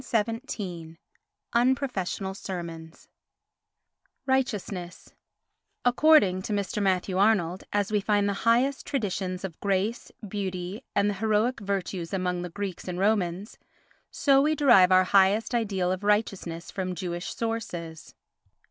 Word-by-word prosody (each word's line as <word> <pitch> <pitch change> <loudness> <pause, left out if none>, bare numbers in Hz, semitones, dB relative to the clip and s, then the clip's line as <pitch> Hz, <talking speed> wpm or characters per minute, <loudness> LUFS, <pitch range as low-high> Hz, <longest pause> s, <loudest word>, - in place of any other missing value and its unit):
XIII 210 - -3 0.6
Unprofessional 235 -7 0
Sermons 170 -4 -7 1.2
Righteousness 210 -9 -2 0.7
ACCORDING 245 -7 +5
to 200 - -6
Mr. 205 +1 -2
Matthew 190 -1 +1
Arnold, 195 -4 +2
as 205 0 0
we 210 -1 +2
find 205 0 +2
the 200 - 0 0.2
highest 260 +4 +2
traditions 190 -7 -2
of 180 -4 -6
grace, 200 +4 -1 0.2
beauty 190 +2 -4
and 200 0 +3
the 205 - +1
heroic 220 +3 +1
virtues 195 -3 -3
among 180 -1 -1
the 180 - -5
Greeks 195 0 -6
and 180 -1 -4
Romans, 195 -1 0 0.5
so 275 -2 +3
we 305 +2 +2
derive 240 -11 +6
our 185 0 +6
highest 195 +5 +3
ideal 195 -6 0
of 185 +2 -3
righteousness 195 -5 -1
from 185 -1 -3
Jewish 175 0 -4
sources. 175 -9 -5
195 Hz, 120 wpm, -27 LUFS, 180-220 Hz, 1.2 s, derive